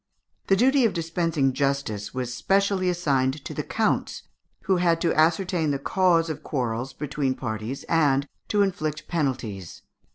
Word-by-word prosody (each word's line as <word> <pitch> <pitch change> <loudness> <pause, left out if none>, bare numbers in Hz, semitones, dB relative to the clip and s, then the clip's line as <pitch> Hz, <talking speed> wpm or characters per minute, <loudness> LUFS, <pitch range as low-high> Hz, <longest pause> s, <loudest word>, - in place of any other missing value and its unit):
The 195 - +5
duty 260 +5 +4
of 225 - +2
dispensing 165 -5 0
justice 135 -7 -1
was 125 -2 -4
specially 195 +6 +1
assigned 140 -5 0
to - - -5
the - - -2
counts, - - -1 0.4
who 190 -1 +2
had 170 -2 +2
to 170 - +2
ascertain 165 +1 +2
the 140 - 0
cause 170 +2 +2
of 155 -3 -5
quarrels 125 -1 -2
between 140 -3 -2
parties 110 +4 -5
and 145 -4 +2 0.2
to 205 -1 +3
inflict 155 -5 -3
penalties. 125 - -3
155 Hz, 150 wpm, -25 LUFS, 135-180 Hz, 0.4 s, The